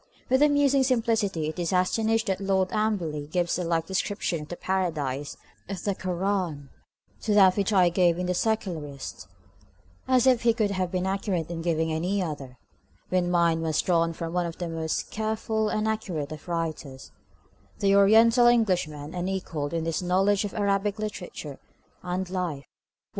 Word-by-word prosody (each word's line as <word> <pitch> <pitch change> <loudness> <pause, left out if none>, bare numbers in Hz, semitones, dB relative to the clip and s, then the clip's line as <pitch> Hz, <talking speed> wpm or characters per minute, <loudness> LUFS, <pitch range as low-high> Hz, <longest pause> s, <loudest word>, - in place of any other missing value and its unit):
With 260 +2 +3
amusing 285 -2 +4
simplicity 225 - 0
he 180 - -4
is 170 - -1
astonished 220 +5 +1
that 190 -2 -1
Lord 190 -1 +1
Amberley 180 -9 -1
gives 175 +2 0
a - - -1
like 165 -1 0
description 190 -2 -2
of 150 - -9
the 175 - -6
paradise 155 -8 -2 0.3
of 195 -3 -5
the 200 - 0
Kur 185 -2 -4
ân 180 -8 -1 0.5
to 210 -2 0
that 190 -3 +6
which 200 0 0
I 185 -4 +5
gave 175 -1 +2
in 180 - -2
the 180 - 0
Secularist, 175 -9 -3 0.8
as 255 -1 +4
if 255 -3 +4
he 230 -1 +3
could 215 -4 +1
have 185 -2 -1
been 185 0 -1
accurate 190 -4 -2
in 165 -1 -4
giving 160 -1 0
any 180 +6 -1
other, 145 -8 -5 0.5
when 180 -1 +1
mine 170 -2 +2
was 160 -2 0
drawn 165 -2 +2
from 165 0 -5
one 180 -1 0
of 165 - -7
the 175 - -3
most 160 -1 -3
careful 220 0 -1
and 215 0 -1
accurate 180 -9 -3
of 155 +1 -9
writers, 160 -5 -4 0.7
the 200 -1 +3
Oriental 225 +4 +6
Englishman, 180 -10 +1
unequalled 180 -5 -3
in 165 -1 -2
his 165 +1 -1
knowledge 195 +3 +2
of 205 - -6
Arabic 200 0 0
literature 180 -9 -6 0.4
and 180 +1 -3
life! 170 -7 -3
185 Hz, 170 wpm, -26 LUFS, 165-205 Hz, 0.8 s, that